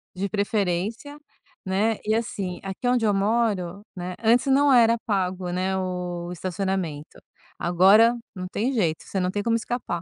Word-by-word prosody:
De 195 +2 -2
preferência, 205 +6 -2 0.5
né, 205 +4 +1
e, 215 +1 +2
assim, 200 -6 -3
aqui 195 +6 -4
onde 245 -2 +2
eu 210 - +3
moro, 200 -2 0
né, 180 0 -5
antes 235 +2 +4
não 280 +1 +4
era 230 -1 +5
pago, 185 -3 -1
né, 185 +2 -1
o 180 -2 -4
estacionamento, 180 -4 -4 0.4
agora 195 +7 +5 0.2
não 185 -2 -6
tem 220 +7 -1
jeito, 170 -9 0
você 195 - -4
não 180 0 0
tem 205 +2 -2
como 230 +1 +1
escapar, 230 -6 -4
195 Hz, 155 wpm, -24 LUFS, 180-225 Hz, 0.5 s, era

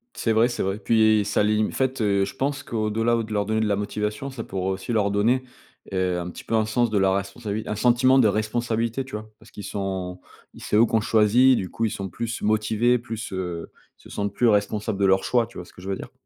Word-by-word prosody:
C'est 115 - 0
vrai, 115 +3 +4
c'est - - -3
vrai, 95 +2 -1
puis 110 -1 +3
ça 105 +1 0
lim 105 +1 +2
en - - -7
fait 130 -1 -1
je 100 +2 +1
pense, 140 +2 -2
qu'au-delà 115 +1 0
de 110 - -9
leur 105 -1 0
donner 110 +1 0
de 110 - +1
la 100 -1 +1
motivation, 105 +5 -3
ça 130 -4 -6
pourrait 95 -1 -3
aussi 95 +4 -4
leur 105 -3 +2
donner, 115 +6 +2 0.5
heu, 90 -1 0
un 85 0 -5
petit - - -10
peu - - -5
un 110 -1 +2
sens 120 +2 +1
de 105 - 0
la 95 -1 +3
responsabi 100 +2 -3
un 105 - -3
sentiment 125 +3 +4
de 120 - +5
responsabilité, 115 +3 -1
tu 130 - -7
vois? 110 0 -8
Parce 110 - -18
qu'ils 105 - -9
sont 95 -3 -4 0.3
i - - -13
c'est - - -2
eux 110 +2 +6
qu'on 110 0 +1
choisit 115 +4 +4
du 95 - -3
coup 115 - -1
ils 110 - -1
sont 95 -1 -5
plus 115 -1 -4
motivés 110 +3 +2
plus, 115 -3 -6
heu, 90 -3 -5 0.3
ils - - -21
se - - -14
sentent 100 -1 -3
plus 120 - +2
responsables 105 0 0
de 100 - +3
leur 95 0 +3
choix, 120 -2 +1
tu - - -14
vois 90 - -7
ce - - -17
que 90 - -14
je 95 - -9
veux 95 - 0
dire? - - -9
110 Hz, 255 wpm, -24 LUFS, 100-115 Hz, 0.5 s, eux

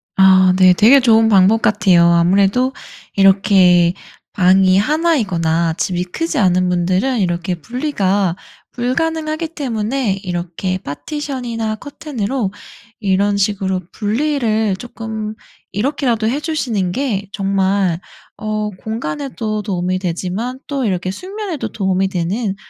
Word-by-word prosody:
아 190 -1 +6
네. 185 -1 +7
되게 240 +9 +6
좋은 225 -3 +4
방법 205 +1 +4
같아요. 205 -6 +4
아무래도 195 +9 +3 0.4
이렇게 190 -3 +4 0.4
방이 185 0 +4
1 315 - +2
이거나 170 - 0
집이 180 0 -2
크지 320 - -3
않은 185 -3 +2
분들은 185 +8 0
이렇게 175 -1 -1
분리가 200 - -1 0.4
불가능하기 310 +5 -2
때문에 250 - -2
이렇게 180 +1 -3
파티션이나 230 - -4
커튼으로 255 -5 -4 0.5
이런 200 +1 +1
식으로 195 -2 0
분리를 220 -2 0
쪼끔 220 -2 -6 0.4
이렇게라도 235 0 0
해 270 +5 -1
주시는 245 - -2
게 210 -4 -2
정말 195 -3 0 0.4
어 215 -1 -2
공간에도 220 - -4
도움이 185 -2 -1
되지만 190 +8 -3
또 275 -4 -2
이렇게 185 -2 -1
숙면에도 380 - -5
도움이 190 -2 0
되는 195 +3 -2
205 Hz, 275 characters per minute, -17 LUFS, 185-250 Hz, 0.5 s, 네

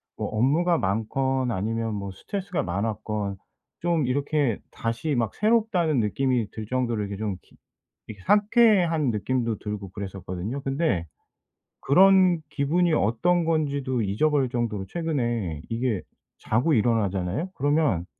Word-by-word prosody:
뭐 - - -3
업무가 155 +10 +2
많건 130 +5 0
아니면 115 +2 -2
뭐 100 -1 -5
스트레스가 190 - -4
많았건 105 +1 -3 0.4
좀 170 -4 +1
이렇게 140 -2 0
다시 115 +6 -2
막 115 -3 -1
새롭다는 210 - +2
느낌이 120 +1 0
들 110 - -6
정도로 120 -3 -1
이렇게 100 -1 -4
좀 105 -2 -2
기 - - -25 0.5
이렇게 105 -3 -10
상쾌한 205 - +4
느낌도 115 +1 -1
들고 105 -2 -5
그랬었거든요. 95 +4 -5
근데 135 - 0 0.8
그런 185 +2 +5
기분이 160 +4 +1
어떤 165 - +2
건지도 140 -6 0
잊어버릴 135 +7 +1
정도로 115 -5 -2
최근에 120 - -2
이게 115 -3 -1 0.4
자고 125 +9 +1
일어나잖아요? 105 - 0
그러면 145 - +1
125 Hz, 305 characters per minute, -25 LUFS, 105-155 Hz, 0.8 s, 그런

